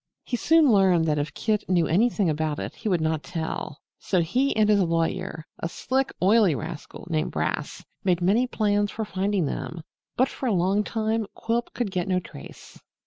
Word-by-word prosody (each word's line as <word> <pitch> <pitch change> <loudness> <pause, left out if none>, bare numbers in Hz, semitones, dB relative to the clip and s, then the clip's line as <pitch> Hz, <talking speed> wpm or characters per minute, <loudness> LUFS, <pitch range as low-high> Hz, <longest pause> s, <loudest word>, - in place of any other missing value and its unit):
He 245 - -3
soon 315 +2 +4
learned 190 -5 +4
that 150 -2 +1
if 145 +1 -4
Kit 215 -3 -1
knew 175 -3 +3
anything 205 +3 +2
about 155 -1 -1
it - - -5
he 220 - -4
would 180 -4 +1
not 160 -1 0
tell, 160 -3 -5 0.2
so 185 - 0
he 245 - +1
and 215 -1 +3
his 210 -1 +4
lawyer 165 -1 -1
(a 165 - -3
sleek, 265 +8 -1
oily 200 -4 +5
rascal 160 +2 -7
named 155 -1 0
Brass) - - -3 0.2
made 180 -3 +2
many 205 +8 +2
plans 205 -3 +1
for 220 +1 -4
finding 195 -2 0
them. 165 +3 -5 0.3
But 260 - +4
for 265 - -5
a 225 - +2
long 190 +3 +2
time 220 0 -1
Quilp 235 +1 -2
could 235 -5 -2
get 180 -2 -2
no 185 -1 +2
trace. 170 - -12
190 Hz, 190 wpm, -25 LUFS, 165-220 Hz, 0.3 s, oily